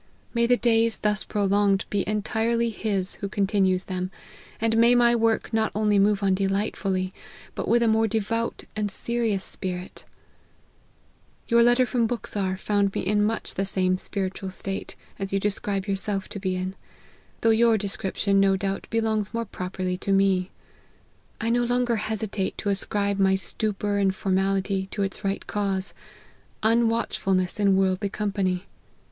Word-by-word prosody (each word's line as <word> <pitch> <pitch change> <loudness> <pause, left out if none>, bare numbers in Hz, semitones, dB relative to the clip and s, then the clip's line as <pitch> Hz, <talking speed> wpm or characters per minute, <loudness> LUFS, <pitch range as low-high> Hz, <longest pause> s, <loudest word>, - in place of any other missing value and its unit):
May 235 -1 +2
the 245 0 +4
days 230 -2 +2
thus 210 0 0
prolonged 200 -1 +1
be 200 -2 +1
entirely 225 +2 0
His 200 -4 -2
who 200 - -2
continues 195 -2 +1
them! 185 -1 -3 0.5
and 225 0 +1
may 235 +2 +5
my 240 0 +5
work 225 0 +1
not 220 0 +1
only 210 -1 +3
move 205 0 +3
on 195 -1 +3
delightfully, 195 -1 -1 0.4
but - - -4
with 235 0 +4
a - - +3
more 220 0 +3
devout 225 +2 -2
and 210 -1 -1
serious 225 -1 -1
spirit 180 -1 -5 0.5
!" - - -36
" - - -36
Your 235 -1 +5
letter 240 +2 +5
from 240 -2 +1
Buxar 200 -5 -2
found 200 0 0
me - - 0
in 205 +2 +1
much 225 +2 -1
the 195 - -1
same 185 -1 +1
spiritual 190 -1 -4
state, 195 +1 -4 0.2
as 195 0 -3
you 195 - +1
describe 200 -1 -1
yourself 195 0 -2
to 200 - -6
be 190 -1 -1
in: 185 +1 -3 0.7
though 225 - +4
your 225 0 +4
description, 195 0 0
no 195 -1 +4
doubt, 195 0 -3
belongs 220 -1 0
more 230 0 -1
properly 185 -2 -4
to 200 - -2
me. 195 -1 +3 0.9
I 230 - 0
no 240 +1 +2
longer 245 -1 +1
hesitate 215 -2 -2
to 205 - -2
ascribe 200 0 0
my 190 0 +4
stupor 205 +1 -1
and 195 -1 +2
formality, 195 0 0
to 200 - -2
its 195 - -4
right 195 0 -2
cause: 195 -2 0 0.7
unwatchfulness 220 -5 +1
in 200 -2 +4
worldly 190 +1 +1
company. 195 -3 -1
200 Hz, 160 wpm, -25 LUFS, 195-220 Hz, 0.9 s, may